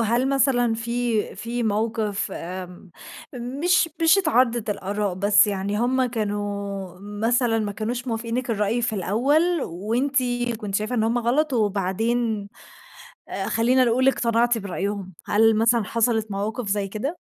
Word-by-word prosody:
هل 235 +4 +1
مثلًا 255 -4 +2
في 235 -1 -1
في 235 +1 -3
موقِف 215 -1 -1
آمم 180 +1 -8 0.4
مش 285 +9 +1
مش 325 +4 +6
اتعارضت 245 - +2
الآراء، 200 -1 -2
بس 200 +3 +4
يعني 200 0 -2
هم 255 +2 +2
كانوا 205 -4 -4
مثلًا 225 +3 0
ما 210 -2 -2
كانوش 240 +4 -4
موافقينِك 235 +2 -2
الرأي 215 +2 0
في 235 - 0
الأول 280 - +1
وأنتِ 230 +11 -2 0.4
كنت 210 -3 -6
شايفة 215 +4 -1
إن 225 - +1
هم 230 +2 +1
غلط 270 +6 +1
وبعدين 215 +1 0 0.8
آآ 195 - -3
خلّينا 245 +4 +3
نقول 250 +2 +2
اقتنعتِ 235 -2 +2
برأيهم، 200 -1 -4
هل 225 +2 +4
مثلًا 230 +1 +3
حصلت 225 0 0
مواقِف 215 +4 -3
زي 200 0 0
كده؟ 265 - -4
225 Hz, 135 wpm, -23 LUFS, 205-245 Hz, 0.8 s, مش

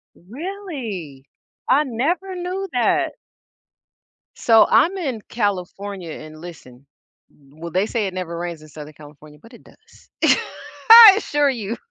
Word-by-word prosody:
Really? 235 - -8 0.4
I 295 +3 +3
never 320 +10 -3
knew 365 +2 -5
that. 330 +5 0 1.2
So 225 -2 +4
I'm 380 +4 +3
in 270 -11 -4
California 200 -3 -4
and 155 0 -11
listen. 140 -6 -13 0.7
Well, 165 +3 -9
they 185 +4 0
say 225 -2 -2
it 190 - -6
never 180 -2 -5
rains 170 -2 -6
in 155 - -15
Southern 150 0 -11
California, 150 0 -16
but 230 - -18
it - - -16
does. - - -23 0.8
I 450 -3 +11
assure 295 -9 0
you. 230 -3 -5
215 Hz, 130 wpm, -20 LUFS, -, 1.2 s, I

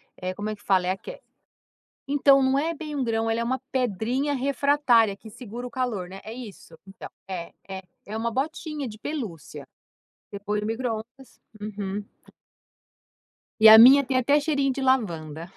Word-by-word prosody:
é, 185 0 -4
como 205 +2 -4
é - - -5
que 205 - -24
fala? 185 -2 +2
É - - +2
aque - - -7 0.9
então, 275 -1 +4
não 265 +1 +2
é 325 +3 -1
bem 305 -1 -7
um 275 - -1
grão, 225 -1 -1
ela 225 +1 0
é - - 0
uma 260 +3 -1
pedrinha 255 +3 -1
refratária 270 -5 +2
que 220 +2 -13
segura 240 +2 -8
o 250 - -7
calor, 230 -8 -3
né? 190 +1 -9
É 220 - -8
isso? 215 -9 -11
Então, 195 0 -10 0.2
é, 180 -3 -6 0.2
é, 190 0 -6 0.2
é 215 +2 -5
uma 230 +1 -2
botinha 300 +2 -3
de 215 - -9
pelúcia. 220 - -6 0.6
Você 200 - -7
põe 210 +1 -2
no 210 - -4
microondas. 235 +2 -5 0.2
Uhum. 205 -1 -5 1.6
E 220 - +4
a 220 - +11
minha 265 +5 +9
tem 260 -1 -1
até 280 +4 +3
cheirinho 280 -3 0
de 270 - -5
lavanda. 170 - -1
235 Hz, 175 wpm, -25 LUFS, 205-270 Hz, 1.6 s, a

